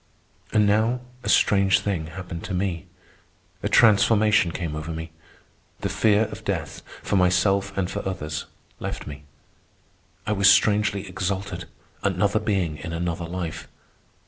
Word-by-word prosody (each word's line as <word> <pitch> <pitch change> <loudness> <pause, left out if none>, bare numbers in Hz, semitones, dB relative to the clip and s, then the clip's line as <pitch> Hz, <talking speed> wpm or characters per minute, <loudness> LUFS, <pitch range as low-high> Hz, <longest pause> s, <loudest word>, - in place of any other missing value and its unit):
And 105 -1 +4
now 110 +4 +2 0.2
a - - -4
strange 100 -1 +4
thing 90 -6 -2
happened 90 0 -7
to 95 - -3
me. 90 -3 -2 0.7
A - - -1
transformation 105 -3 +4
came 80 -3 -4
over 75 +1 -5
me. 80 0 -6 0.7
The - - -1
fear 105 -1 +3
of - - -9
death, - - -3 0.2
for 100 - 0
myself 95 +2 +2
and 95 -2 +1
for - - -4
others, 75 -6 -4 0.3
left - - -5
me. 75 0 -9 1.0
I - - -1
was 100 -1 +5
strangely 105 -2 +3
exalted, 95 0 -3 0.4
another 100 +2 +1
being 95 -8 -1
in 80 +2 -6
another 85 0 -2
life. 85 -1 -5
95 Hz, 140 wpm, -24 LUFS, 85-100 Hz, 1.0 s, was